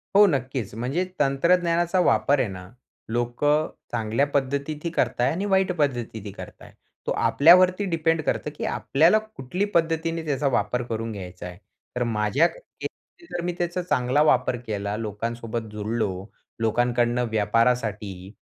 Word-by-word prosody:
हो, 205 +1 +9
नक्कीच. 130 - -2
म्हणजे 130 +10 -1 0.2
तंत्रज्ञानाचा 170 +5 +2
वापर 135 0 +3
आहे 125 - +1
ना, 90 -1 -9 0.4
लोकं 120 +6 +1 0.2
चांगल्या 115 +3 +1
पद्धतीतही 140 +3 -2
करताय 125 -6 +1
आणि 185 +5 -2
वाईट 190 -2 +2
पद्धतीतही 120 -8 -2
करताय. - - -11 0.4
तो - - +1
आपल्यावरती 185 +5 +5
डिपेंड 165 -1 +1
करतं 150 - -1
की - - -3
आपल्याला 165 +9 +3
कुठली 200 -4 -4
पद्धतीने 165 0 +1
त्याचा 145 -1 0
वापर 125 -1 0
करून 115 0 -3
घ्यायचा 90 -3 -8
आहे. 90 0 -10 0.4
तर 125 - 0
माझ्या 115 +7 +2 0.4
मते 340 - -10
जर 175 - -2
मी 175 - -1
त्याचा 175 +1 -1
चांगला 130 -4 +1
वापर 130 -4 +3
केला, 100 -1 -2
लोकांसोबत 115 +1 -4
जुडलो, 105 -3 -2 0.4
लोकांकडून 120 +1 +1
व्यापारासाठी 105 -3 0
125 Hz, 135 wpm, -24 LUFS, 110-165 Hz, 0.4 s, हो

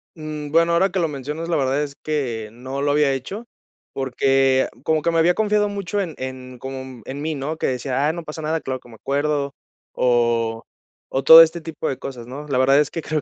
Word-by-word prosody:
Mm, 155 -2 -6
bueno, 165 +1 +4
ahora 190 +3 +3
que 185 0 -2
lo 165 - +2
mencionas, 150 +3 -5
la 170 - +2
verdad 135 +1 +1
es 140 -1 -7
que 125 -9 -3
no 130 +4 -6
lo 145 - +1
había 145 -1 +3
hecho, 190 - -5 0.5
porque 135 0 +2 0.2
como 155 0 +1
que 170 - +1
me 165 - +2
había 170 +2 +4
confiado 210 -1 +2
mucho 200 0 -2
en 170 -5 -5
en 130 -1 -7
como, 135 0 -6
mm, 130 -3 -11
en 140 +2 -6
mí, 155 0 -2
¿no?, 145 +3 -4
que - - -1
decía: 130 +2 -1
"Ah, 155 - +1
no 170 0 -6
pasa 155 0 -7
nada, 160 +1 -1
claro 130 -1 -4
que 125 - -18
me 115 - -13
acuerdo", 140 +3 -1 0.4
o 115 -2 +1 0.5
o 135 - -1
todo 160 +4 +11
este 165 +1 +3
tipo 160 -1 -5
de 135 - -2
cosas, 120 -3 -7
¿no? 145 +4 -8
La 140 -3 0
verdad 135 +2 +5
es 150 - +1
que 165 - -4
creo 155 -1 -2
145 Hz, 230 wpm, -22 LUFS, 130-160 Hz, 0.5 s, todo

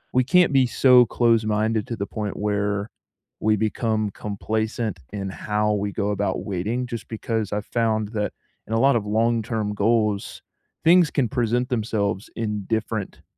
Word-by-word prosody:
we 130 - +5
can't 175 +3 +4
be 135 -2 +4
so 125 0 +5
close-minded 110 -2 +1
to 115 - -3
the 100 -2 -3
point 105 -1 -4
where 105 0 -1 0.5
we 110 0 +2
become 110 0 -1
complacent 110 0 -3
in 100 -1 -4
how 105 +2 -1
we 100 0 -1
go 100 0 -1
about 100 0 -2
waiting, 105 +6 -2
just 120 -2 -6
because 110 -2 -3
I've 105 0 -2
found 110 -3 0
that 105 -2 -2 0.4
in 110 - -4
a 115 - +2
lot 135 +2 +4
of 105 -3 -1
long-term 110 -1 0
goals, 105 -1 0 0.4
things 170 -1 +6
can 135 -4 +1
present 125 0 0
themselves 110 -5 -1
in 105 -3 -3
different 110 -2 -3
110 Hz, 155 wpm, -23 LUFS, 105-115 Hz, 0.5 s, things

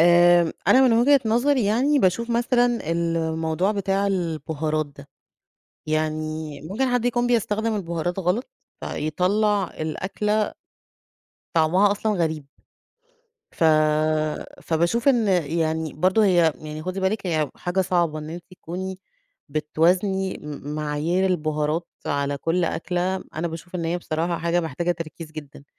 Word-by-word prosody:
آمم، 175 0 +6 0.2
أنا 260 - +7
من - - +3
وِجهة 260 +4 +5
نظري 245 +3 +2
يعني 260 +8 +2
باشوف 230 +4 +1
مثلًا 240 - +1
الموضوع 165 +2 0
بتاع 195 0 0
البُهارات 160 -4 -1
ده، 140 0 -15 0.8
يعني 155 -1 -2
ممكن 210 - -1
حد 245 -1 +1
يكون 245 0 +1
بيستخدم 225 -1 +1
البُهارات 175 -1 -2
غلط، 190 - -1 0.3
فيطلّع 200 +6 +1 0.2
الأكلة 210 +6 -1 1.0
طعمها 175 +5 +4
أصلًا 215 +1 -1
غريب. 160 -6 -1 1.1
ف - - +1 1.0
فباشوف 170 - +1
إن 240 -5 +3 0.3
يعني 160 -1 -1
برضه 185 +7 +3
هي 175 -4 +4
يعني 155 0 -7
خدي 185 +2 -4
بالِك 195 +2 0
يعني 155 -5 0
حاجة 175 +2 -1
صعبة 175 -4 +1
إن 155 0 -7
أنتِ 170 +1 -7
تكُوني 185 +1 -6 0.5
بتوازني 180 +6 +1
م 150 0 -6
معايير 155 +5 0
البُهارات 155 -1 -1 0.2
على 140 0 -1
كل 170 +5 0
أكلة، 180 +3 -2
أنا 165 +2 -2
باشوف 165 +3 -9
إن 170 -2 -2
هي 170 +2 -1
بصراحة 170 +1 -2
حاجة 170 +1 +1
محتاجة 165 +2 -2
تركيز 165 -1 -8
جدًا 145 -2 -10
175 Hz, 130 wpm, -23 LUFS, 155-200 Hz, 1.1 s, أنا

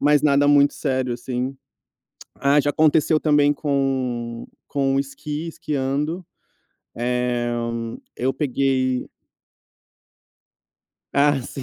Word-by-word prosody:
mas 145 0 +4
nada 145 -1 +4
muito 145 0 +5
sério, 130 -3 -1
assim. 125 +2 -3 0.8
Ah, 140 +1 +3
já 145 0 +1
aconteceu 155 0 +3
também 145 -1 +3
com 130 -5 -2 0.2
com 135 -1 0
o - - +3
esqui, 150 +3 -5
esquiando, 150 +3 -2 0.7
eh, 125 0 0 0.7
eu 130 +2 0
peguei 130 -2 0 2.1
Ah, 145 -1 +3
sim. 135 - -7
140 Hz, 100 wpm, -22 LUFS, 130-145 Hz, 2.1 s, muito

